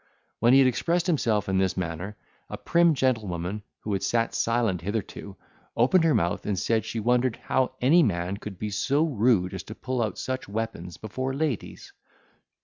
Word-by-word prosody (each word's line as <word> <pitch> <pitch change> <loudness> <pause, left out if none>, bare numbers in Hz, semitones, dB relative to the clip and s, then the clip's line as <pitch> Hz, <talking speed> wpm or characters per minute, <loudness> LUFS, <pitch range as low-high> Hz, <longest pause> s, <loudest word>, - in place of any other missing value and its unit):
When 120 +2 +4
he - - +8
had 135 -1 +6
expressed 170 +7 0
himself 115 - +1
in 95 0 +1
this 95 -1 0
manner, 90 +4 -4 0.3
a - - -5
prim 170 -2 +3
gentlewoman, 105 -7 -1 0.2
who 105 - -3
had 95 - -1
sat 115 -1 0
silent 115 -7 0
hitherto, 100 0 -5 0.4
opened 165 +9 +4
her 160 - +3
mouth, 85 +1 0
and 100 -2 0
said, 110 +4 0
she 115 - -4
wondered 120 +2 +2
how 130 0 0
any 150 +8 +5
man 95 - 0
could 100 -2 -8
be 105 +2 -4
so 140 +9 +1
rude 115 - +2
as 95 - -4
to 110 - -8
pull 130 0 -3
out 110 -5 -2
such 130 -4 -4
weapons 100 -5 -4
before 130 +5 -4
ladies. 145 -6 -3
115 Hz, 180 wpm, -26 LUFS, 95-130 Hz, 0.4 s, he